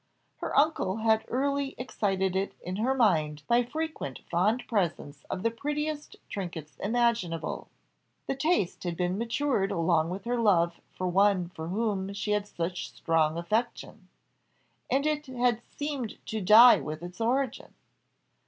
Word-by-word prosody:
Her - - -3
uncle 280 -10 +2
had 220 0 +2
early 280 +2 -1
excited 195 -6 -1
it 195 +1 -1
in 185 +2 -5
her 255 +5 +1
mind 155 - +2
by 240 +1 +4
frequent 295 - -4
fond 210 +8 +2
presents 165 -8 -2
of 185 - -3
the 230 - +2
prettiest 295 +4 -3
trinkets 165 -7 -6
imaginable; 220 -7 0 0.6
the 270 - -2
taste 285 - 0
had 175 -2 -3
been 180 +2 -1
matured 235 -3 0
along 165 -3 +2
with 190 +2 -5
her 240 0 0
love 170 -6 +2
for 185 - -3
one 185 -1 +3
for 160 -2 -7
whom 200 0 -1
she 200 +1 -3
had 210 0 0
such 170 -8 -4
strong 155 +5 +1
affection, 215 +8 -2 0.8
and 275 +2 +1
it 300 -1 -1
had 245 -2 +1
seemed 285 -6 -4
to 220 -1 -3
die 220 +6 +8
with 155 +2 -6
its 175 +5 -8
origin. 255 +2 -1
205 Hz, 145 wpm, -28 LUFS, 175-245 Hz, 0.8 s, die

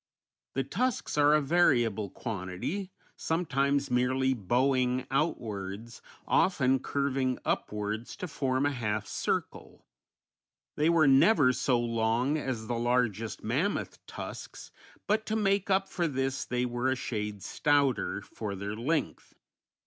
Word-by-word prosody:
The 135 - +1
tusks 235 - -1
are 145 0 +5
a 155 - +3
variable 120 - +2
quantity, 110 - -4 0.3
sometimes 140 -4 0
merely 130 +2 +2
bowing 125 +3 +1
outwards, 115 - -3 0.3
often 135 -8 +3
curving 135 -2 -1
upwards 105 +2 -2
to 180 - -5
form 135 -3 0
a 145 - +2
half 110 -5 -2
circle; - - -3 0.9
they 150 +2 +2
were 165 -2 +5
never 135 0 +5
so 125 -1 +1
long 115 +4 +1
as 130 -7 -3
the 120 0 -2
largest 115 -3 0
mammoth 140 - -1
tusks, - - -8 0.3
but 215 +1 +1
to 220 - -1
make 200 -2 +1
up 195 0 +2
for 175 -2 -1
this 135 -2 -2
they 125 0 -1
were 120 +1 -1
a 130 - +1
shade 105 -5 -4
stouter 145 -2 +1
for 105 -3 -6
their 100 +2 -4
length. 140 +6 -2
130 Hz, 125 wpm, -29 LUFS, 115-145 Hz, 0.9 s, are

